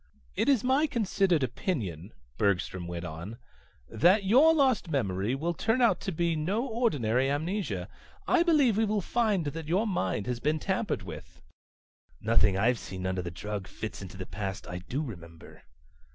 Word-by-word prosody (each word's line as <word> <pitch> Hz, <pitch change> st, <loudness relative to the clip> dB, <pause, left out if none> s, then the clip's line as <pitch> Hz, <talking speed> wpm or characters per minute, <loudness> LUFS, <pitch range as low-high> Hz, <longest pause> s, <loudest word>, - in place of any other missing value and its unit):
"It -, -, +1 dB
is 265 Hz, -6 st, +3 dB
my 270 Hz, +5 st, +3 dB
considered 195 Hz, -, +1 dB
opinion," 105 Hz, -, -3 dB, 0.3 s
Bergstrom 95 Hz, -2 st, 0 dB
went 85 Hz, 0 st, -5 dB
on, 85 Hz, +7 st, -7 dB, 0.5 s
"that 180 Hz, -, +4 dB
your 260 Hz, +11 st, +6 dB
lost 265 Hz, -, +2 dB
memory 110 Hz, -, 0 dB
will 165 Hz, +5 st, -1 dB
turn 225 Hz, +8 st, 0 dB
out 240 Hz, -2 st, +4 dB
to 195 Hz, -, -3 dB
be 170 Hz, 0 st, 0 dB
no 190 Hz, -, -1 dB
ordinary 140 Hz, -, +1 dB
amnesia. 170 Hz, +8 st, -2 dB, 0.4 s
I 365 Hz, -, +4 dB
believe 295 Hz, -, +4 dB
we 225 Hz, -, +3 dB
will 210 Hz, -1 st, 0 dB
find 210 Hz, -4 st, +1 dB
that 150 Hz, +2 st, -5 dB
your 185 Hz, +7 st, +2 dB
mind 100 Hz, -, -1 dB
has 125 Hz, 0 st, -2 dB
been 150 Hz, +5 st, +1 dB
tampered 190 Hz, -, -2 dB
with." 80 Hz, -5 st, -10 dB, 0.8 s
"Nothing 105 Hz, -3 st, +3 dB
I've 115 Hz, +4 st, +2 dB
seen 95 Hz, -1 st, -7 dB
under 95 Hz, 0 st, -1 dB
the 85 Hz, -, -5 dB
drug 100 Hz, +2 st, -5 dB
fits 110 Hz, -, -7 dB
into 95 Hz, 0 st, -9 dB
the 95 Hz, -, -5 dB
past 95 Hz, -1 st, -5 dB
I 90 Hz, -, -5 dB
do 130 Hz, -, -3 dB
remember." 85 Hz, -, -10 dB
145 Hz, 165 wpm, -29 LUFS, -, 0.8 s, your